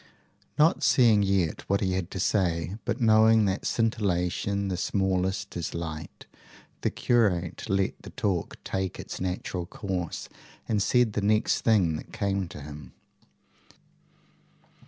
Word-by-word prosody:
Not 155 Hz, +3 st, +4 dB
seeing 115 Hz, -6 st, +5 dB
yet 95 Hz, -5 st, +1 dB
what 100 Hz, +1 st, +3 dB
he 95 Hz, -, 0 dB
had 90 Hz, -1 st, -2 dB
to 95 Hz, -, -6 dB
say, 85 Hz, -2 st, 0 dB
but 120 Hz, +1 st, -1 dB
knowing 110 Hz, -1 st, +5 dB
that 95 Hz, 0 st, -1 dB
scintillation 100 Hz, -3 st, 0 dB
the 95 Hz, -, -1 dB
smallest 95 Hz, +1 st, -1 dB
is 85 Hz, -1 st, -4 dB
light, 80 Hz, -2 st, -6 dB, 0.6 s
the -, -, +1 dB
curate 100 Hz, -8 st, 0 dB
let 95 Hz, 0 st, 0 dB
the -, -, -10 dB
talk 95 Hz, -5 st, -2 dB
take 95 Hz, -1 st, -3 dB
its -, -, -7 dB
natural 90 Hz, -1 st, -3 dB
course, 90 Hz, -4 st, -4 dB, 0.4 s
and 105 Hz, -2 st, +1 dB
said 120 Hz, +1 st, +3 dB
the 105 Hz, -, -1 dB
next 105 Hz, +2 st, +2 dB
thing 95 Hz, -9 st, +3 dB
that -, -, -10 dB
came 100 Hz, -2 st, -1 dB
to 75 Hz, -, -10 dB
him. 75 Hz, -2 st, -10 dB
95 Hz, 135 wpm, -27 LUFS, 90-105 Hz, 0.6 s, seeing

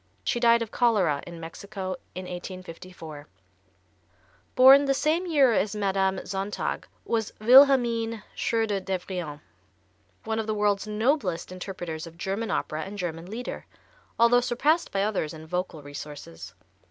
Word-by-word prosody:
She 240 Hz, -, 0 dB
died 235 Hz, -1 st, +5 dB
of 225 Hz, -, -9 dB
cholera 195 Hz, -, +2 dB
in 170 Hz, -1 st, -8 dB
Mexico 185 Hz, +3 st, -6 dB, 0.2 s
in 185 Hz, -, -5 dB
1854. 180 Hz, -4 st, -9 dB, 1.3 s
Born 270 Hz, +2 st, +8 dB
the 275 Hz, 0 st, +2 dB
same 325 Hz, +6 st, +1 dB
year 280 Hz, -7 st, +4 dB
as 215 Hz, 0 st, 0 dB
Madame 195 Hz, -2 st, 0 dB
Sontag 195 Hz, +2 st, -3 dB, 0.2 s
was 225 Hz, -2 st, -1 dB
Wilhelmine 235 Hz, -2 st, +5 dB
Schröder 220 Hz, -4 st, 0 dB
Devrient, 180 Hz, -5 st, -4 dB, 0.8 s
one 220 Hz, 0 st, -2 dB
of 220 Hz, -, -3 dB
the 215 Hz, -, -1 dB
world's 205 Hz, 0 st, +1 dB
noblest 210 Hz, -, 0 dB
interpreters 175 Hz, -3 st, -6 dB
of 165 Hz, 0 st, -13 dB
German 195 Hz, +6 st, -3 dB
opera 155 Hz, +1 st, -2 dB
and 200 Hz, +4 st, -7 dB
German 170 Hz, -2 st, -4 dB
Lieder, 235 Hz, +4 st, -6 dB, 0.5 s
although 235 Hz, +1 st, +5 dB
surpassed 295 Hz, +8 st, +1 dB
by 195 Hz, 0 st, 0 dB
others 190 Hz, -7 st, -1 dB
in 160 Hz, 0 st, -10 dB
vocal 170 Hz, -2 st, -4 dB
resources. 145 Hz, -, -9 dB
200 Hz, 135 wpm, -26 LUFS, 175-230 Hz, 1.3 s, Born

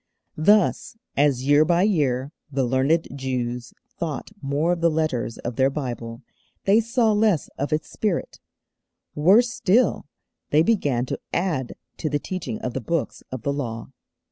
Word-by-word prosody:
Thus, 210 Hz, +6 st, +3 dB, 0.2 s
as 140 Hz, -3 st, +2 dB
year 145 Hz, +2 st, +6 dB
by 175 Hz, +2 st, +3 dB
year 140 Hz, -9 st, +1 dB, 0.2 s
the 135 Hz, -1 st, 0 dB
learned 135 Hz, +6 st, +2 dB
Jews 125 Hz, -3 st, -3 dB, 0.3 s
thought 160 Hz, +2 st, -4 dB
more 145 Hz, +4 st, 0 dB
of 175 Hz, -1 st, -1 dB
the 170 Hz, -, +4 dB
letters 155 Hz, -8 st, -1 dB
of 120 Hz, -1 st, -5 dB
their 135 Hz, 0 st, +4 dB
Bible, 120 Hz, -3 st, -5 dB, 0.4 s
they 200 Hz, +3 st, +5 dB
saw 230 Hz, 0 st, +2 dB
less 210 Hz, -6 st, +2 dB
of 140 Hz, +3 st, -2 dB
its 155 Hz, +1 st, -1 dB
spirit; 205 Hz, -6 st, -2 dB, 0.7 s
worse 205 Hz, +11 st, +4 dB
still, 230 Hz, -, +2 dB, 0.4 s
they 155 Hz, +2 st, +4 dB
began 145 Hz, -, +1 dB
to -, -, -4 dB
add 160 Hz, -9 st, -1 dB, 0.2 s
to 155 Hz, -, -2 dB
the 145 Hz, -, +1 dB
teaching 185 Hz, +8 st, -5 dB
of 125 Hz, -, -3 dB
the 135 Hz, -, -3 dB
Books 165 Hz, +7 st, -2 dB
of 130 Hz, -3 st, -6 dB
the 140 Hz, -, 0 dB
Law. 120 Hz, -4 st, -5 dB
150 Hz, 155 wpm, -24 LUFS, 130-180 Hz, 0.7 s, year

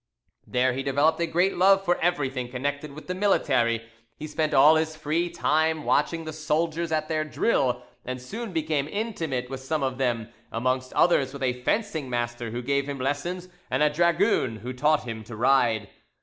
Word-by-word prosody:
There 125 Hz, +1 st, +2 dB
he 135 Hz, -, -3 dB
developed 140 Hz, +4 st, +2 dB
a 170 Hz, -, +1 dB
great 175 Hz, +4 st, +1 dB
love 195 Hz, +1 st, +5 dB
for 175 Hz, -1 st, +2 dB
everything 135 Hz, -8 st, -1 dB
connected 145 Hz, +3 st, -3 dB
with 155 Hz, -, -10 dB
the 180 Hz, -, -3 dB
military; 130 Hz, -, +1 dB, 0.3 s
he -, -, -6 dB
spent 155 Hz, 0 st, -1 dB
all 150 Hz, +4 st, +7 dB
his 160 Hz, 0 st, 0 dB
free 155 Hz, +3 st, -1 dB
time 160 Hz, -2 st, +1 dB
watching 165 Hz, +2 st, +1 dB
the 155 Hz, -, -5 dB
soldiers 160 Hz, +2 st, -1 dB
at 155 Hz, -1 st, 0 dB
their 155 Hz, -1 st, 0 dB
drill, 130 Hz, -, 0 dB, 0.2 s
and 130 Hz, 0 st, -5 dB
soon 215 Hz, -, -6 dB
became 155 Hz, -4 st, -1 dB
intimate 160 Hz, -, -3 dB
with 135 Hz, 0 st, -6 dB
some 140 Hz, +2 st, -2 dB
of 130 Hz, -1 st, -2 dB
them, 120 Hz, -4 st, -1 dB, 0.2 s
amongst 130 Hz, +2 st, -1 dB
others 140 Hz, -6 st, +3 dB
with 140 Hz, -1 st, -6 dB
a 125 Hz, -1 st, +2 dB
fencing 165 Hz, -, -1 dB
master 120 Hz, -1 st, -2 dB
who 120 Hz, +2 st, -5 dB
gave 140 Hz, +2 st, 0 dB
him 140 Hz, -1 st, -4 dB
lessons, 145 Hz, +7 st, -2 dB, 0.2 s
and 130 Hz, +4 st, +1 dB
a 150 Hz, -, +4 dB
dragoon 170 Hz, -, +2 dB
who 125 Hz, +4 st, -6 dB
taught 150 Hz, +4 st, +2 dB
him 115 Hz, -2 st, -6 dB
to 110 Hz, -, -8 dB
ride. 115 Hz, -3 st, +2 dB
145 Hz, 185 wpm, -26 LUFS, 130-160 Hz, 0.3 s, all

